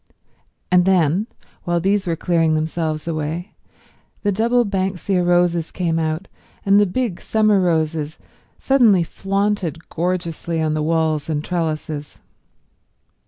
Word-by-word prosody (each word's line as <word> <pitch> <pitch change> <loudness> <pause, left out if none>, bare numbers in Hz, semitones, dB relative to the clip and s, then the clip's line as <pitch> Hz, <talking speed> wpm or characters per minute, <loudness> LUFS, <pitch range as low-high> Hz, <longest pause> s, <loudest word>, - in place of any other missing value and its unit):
And 180 -1 +5
then, 185 +2 +2 0.4
while 175 0 0
these 195 +2 +1
were 165 - 0
clearing 165 -1 +1
themselves 155 0 -2
away, 160 +3 -3 0.7
the 205 - +2
double 235 +4 +2
banksia 190 -1 -1
roses 175 -2 +2
came 165 -3 -1
out, 160 +3 -2 0.4
and 200 +1 +5
the 205 - +4
big 215 -1 -2
summer 215 -2 +2
roses 160 -3 0 0.4
suddenly 230 -10 +4
flaunted 195 -2 -2
gorgeously 170 -1 -2
on 155 -1 0
the 155 - -1
walls 160 -1 0
and 150 -1 -1
trellises. 155 -4 -3
175 Hz, 120 wpm, -20 LUFS, 160-195 Hz, 0.7 s, And